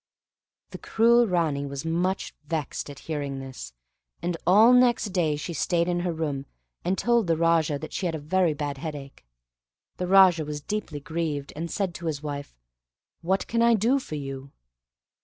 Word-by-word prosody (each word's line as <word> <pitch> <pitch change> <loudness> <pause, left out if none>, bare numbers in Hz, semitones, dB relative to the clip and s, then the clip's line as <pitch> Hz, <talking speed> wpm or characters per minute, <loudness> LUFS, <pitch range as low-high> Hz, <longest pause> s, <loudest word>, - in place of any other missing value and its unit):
The - - -8
cruel 235 +1 +4
Ranee 160 -6 0
was 140 +2 -6
much 175 +4 -1
vexed 150 -2 -3
at 140 - -9
hearing 145 -3 -3
this, 130 - -8 0.5
and 175 0 -2
all 215 +7 +7
next 245 -3 +4
day 160 -5 +1
she 150 +4 -5
stayed 170 +2 +1
in 175 -1 0
her 175 0 -1
room, 145 -4 -3 0.4
and 185 +2 0
told 235 -4 +2
the 165 -1 +2
Raja 165 -3 +2
that 155 - -8
she 185 - -1
had 165 - -2
a - - -4
very 165 +1 +1
bad 145 -2 -4
headache. 145 -3 -7 0.7
The 180 - -2
Raja 185 -3 +6
was 150 0 -5
deeply 155 -3 -4
grieved, 155 -3 -3
and 165 +3 -4
said 190 -2 -2
to 170 0 -6
his 150 -2 -3
wife, 145 - -6 0.6
"What 190 +3 0
can 230 0 0
I 235 0 +5
do 235 +6 +2
for 160 - -7
you?" 135 -1 -6
165 Hz, 175 wpm, -26 LUFS, 145-185 Hz, 0.7 s, all